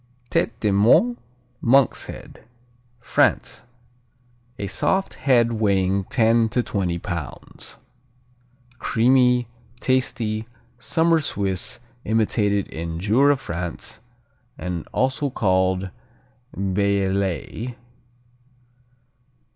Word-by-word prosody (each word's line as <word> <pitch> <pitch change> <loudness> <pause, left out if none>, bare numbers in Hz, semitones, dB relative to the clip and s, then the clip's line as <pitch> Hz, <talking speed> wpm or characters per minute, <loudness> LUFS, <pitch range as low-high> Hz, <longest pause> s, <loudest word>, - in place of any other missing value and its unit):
Tête - - +2
de 105 - +2
Moine, 120 - +4 0.4
Monk's 130 +1 +3
Head - - -10 0.6
France 120 - +1 1.0
A 100 - -4
soft 190 - 0
"head" 120 -4 +2
weighing 95 -2 +2
ten 115 0 +3
to 125 +3 0
twenty 90 -6 -1
pounds. 85 -4 -7 1.0
Creamy, 125 0 +3 0.3
tasty, 115 -4 0 0.3
summer 165 +2 +2
Swiss, 100 -6 -1 0.2
imitated 105 -2 +1
in 80 +1 -5
Jura, 130 +9 +3
France, 85 - -6 0.6
and 90 -3 -4
also 135 +3 0
called 95 -4 +1 0.7
Bellelay. 100 +3 -1
105 Hz, 80 wpm, -23 LUFS, 95-125 Hz, 1.0 s, Moine